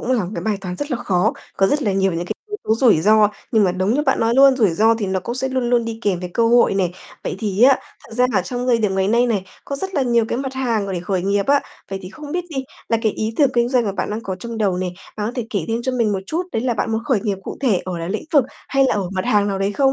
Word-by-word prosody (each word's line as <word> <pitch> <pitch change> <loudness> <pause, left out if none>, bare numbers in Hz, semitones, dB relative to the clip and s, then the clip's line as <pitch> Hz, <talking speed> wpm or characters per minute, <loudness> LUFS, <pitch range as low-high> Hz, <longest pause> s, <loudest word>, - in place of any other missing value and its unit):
cũng 255 - -1
là 230 -7 +1
một 175 - -6
cái - - -4
bài 215 -2 0
toán 180 -2 -5
rất 290 +8 -4
là 255 - 0
khó, 185 -7 +1 0.2
có 195 - +4
rất 290 +8 +1
là 205 -4 +1
nhiều 190 -1 +1
những 170 +1 -3
cái - - -3
yếu 420 - -4
tố 220 - +2
rủi 225 - +4
ro, 210 +3 +5 0.2
nhưng 215 -2 +4
mà 180 - +2
đúng 185 +4 0
như 295 - +1
bạn - - +1
nói 230 +1 +2
luôn, 270 0 +6
rủi 215 -7 +3
ro 220 +7 +3
thì 220 -3 -3
nó 190 0 -1
cũng 235 - -4
sẽ 265 +1 0
luôn 255 -2 -1
luôn 240 -1 +3
đi 225 -1 -5
kèm 185 -4 0
với 180 - -5
cơ 230 -1 +3
hội 235 -4 +4
này. 180 -3 0 0.3
Vậy - - -3
thì 205 0 -1
á, 265 +1 +7 0.3
thật - - -11
ra 250 +2 +4
là 190 -4 +2
trong 245 +4 -4
thời 240 -2 +3
điểm 210 -3 0
ngày 190 0 +1
nay 235 +3 +3
này, 210 -6 0 0.2
có 280 - -4
rất 380 +6 -3
là 280 - +2
nhiều 235 -2 +2
cái 240 - -1
mặt 265 -1 -4
hàng 235 -6 0
mà 195 - -4
để 175 - -2
khởi 180 0 -2
nghiệp 200 +1 0
á. 280 0 +4 0.3
Vậy 195 - -3
thì 185 - -8
không 295 +1 -9
biết 355 0 -1
đi, 270 -3 -3 0.2
là 230 - +3
cái 220 - +2
ý 220 +1 -3
tưởng 285 -4 +4
kinh 240 0 +2
doanh 250 -2 +2
mà 200 - -1
bạn 200 - -3
đang 215 +2 -3
có 190 -3 -4
trong 230 +4 -6
đầu 200 -4 +1
này, 180 -1 -2 0.2
đó, 215 +2 -2
thể 245 -3 -3
kể 200 -7 -1
thêm 230 +1 -1
cho 260 +1 -1
mình 230 -4 +1
một 195 - -1
chút, 325 - -1
đấy 225 - -1
là 250 -2 0
bạn 225 - -1
muốn 220 +1 -2
khởi 240 -6 +1
nghiệp 205 -4 -2
cụ - - -6
thể 230 -10 +2
ở 180 -2 -4
là 165 0 -4
lĩnh 215 +10 -3
vực 285 -5 +5 0.2
hay 275 0 +3
là 265 - +2
ở 200 -3 -1
mặt 185 -1 -2
hàng 205 -1 +2
nào 195 -1 -2
đấy 195 +1 0
không? 270 +4 +3
220 Hz, 330 wpm, -20 LUFS, 195-250 Hz, 0.3 s, á